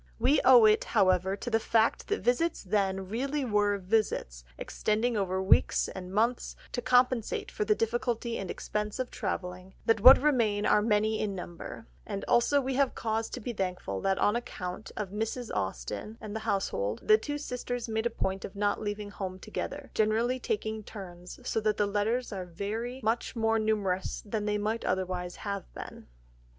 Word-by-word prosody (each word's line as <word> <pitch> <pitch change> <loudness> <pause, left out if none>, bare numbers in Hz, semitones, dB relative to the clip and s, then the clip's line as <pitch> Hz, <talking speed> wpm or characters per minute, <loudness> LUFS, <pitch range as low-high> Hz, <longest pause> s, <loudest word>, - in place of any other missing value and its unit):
We 265 +6 +3
owe 245 -4 +8
it, 215 0 +5
however, 185 0 +3
to 225 - -5
the 225 - +3
fact 225 0 +2
that 420 -2 -1
visits 305 +8 +1
then 195 -1 0
really 270 +7 -1
were 205 -3 +2
visits, 185 - -1
extending 225 +3 0
over 190 -2 0
weeks 190 - +3
or 190 - -4
months, 215 +7 0 0.2
to 245 - -2
compensate 250 -2 +2
for 210 - -2
the 210 0 +3
difficulty 235 +1 -1
and 190 - -5
expense 210 0 -3
of 255 -1 -3
travelling, 185 -2 -4
that 225 -2 +3
what 255 +4 +11
remain 230 -8 +2
are 210 - +4
many 215 0 +2
in 205 -2 -1
number; 175 -2 -8 0.2
and 195 - -5
also 240 +4 +4
we 265 -1 -2
have 275 0 +1
cause 225 0 -1
to - - -6
be 240 +1 -4
thankful 180 - -3
that 195 0 +1
on 205 - +2
account 185 -4 -5
of 205 -3 -3
Mrs. 225 +3 -3
Austen 95 - -4
and 215 -1 -7
the - - -1
household, 110 - -1
the 215 0 +7
two 290 +6 -3
sisters 245 -4 -4
made 220 +1 0
a - - -2
point 190 -4 -2
of 195 - -7
not 205 0 0
leaving 205 -1 -4
home 185 -2 -5
together, - - -6
generally 225 +4 +1
taking 220 - -2
turns, 180 -4 -9
so - - +1
that 215 -1 0
the 205 - +3
letters 210 +4 -1
are 185 -2 -4
very 220 +8 -4
much 225 +3 0
more 225 -1 +2
numerous 205 -4 -1
than 210 0 -2
they 210 0 +1
might 215 +2 -1
otherwise 180 -1 -2
have 200 -2 -5
been. - - -9
215 Hz, 180 wpm, -29 LUFS, 195-235 Hz, 0.2 s, what